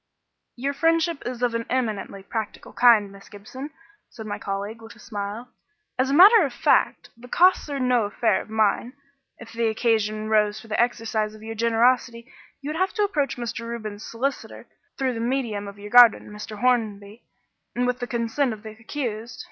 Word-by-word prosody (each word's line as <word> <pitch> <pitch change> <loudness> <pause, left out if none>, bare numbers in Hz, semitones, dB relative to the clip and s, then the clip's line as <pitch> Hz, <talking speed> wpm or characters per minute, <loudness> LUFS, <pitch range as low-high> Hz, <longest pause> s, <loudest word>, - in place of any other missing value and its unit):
"Your 275 +3 -2
friendship 330 +1 +1
is 250 0 -5
of 240 -1 +1
an 230 0 -3
eminently 215 -6 -2
practical 220 +1 -6
kind, 220 -5 +5
Miss 200 0 -15
Gibson," 240 +8 -9 0.4
said 220 - -10
my 205 -1 -5
colleague, 200 +3 -5
with 225 0 -12
a - - -19
smile. 210 +2 -6 0.5
"As 260 +1 +2
a - - 0
matter 405 +5 +8
of 280 - -1
fact, - - +1
the 235 +2 -14
costs 360 +3 +3
are 280 -1 -3
no 250 -3 +2
affair 210 0 +1
of - - -13
mine. 220 +3 +1 0.4
If 230 -1 -12
the 230 0 0
occasion 220 -1 0
arose 215 -1 +1
for 225 - -14
the 215 - +1
exercise 220 -3 -1
of 215 - -14
your 225 0 -6
generosity 235 +1 +1 0.4
you 285 - -4
would 315 - -4
have 375 +1 +1
to 420 - +1
approach 295 -12 -1
Mr. 235 -1 -5
Reuben's 215 -3 -6
solicitor 270 +5 -4 0.3
through 265 -2 0
the 230 - -5
medium 230 -4 -2
of 200 0 -10
your 205 +1 -10
guardian, 245 -3 +6
Mr. 210 0 -8
Hornby, 220 -4 -1 0.5
and 245 - 0
with 250 0 -1
the 245 - -4
consent 235 +2 -1
of 215 0 -11
the 220 - -7
accused. 225 0 -6
230 Hz, 190 wpm, -24 LUFS, 215-250 Hz, 0.5 s, matter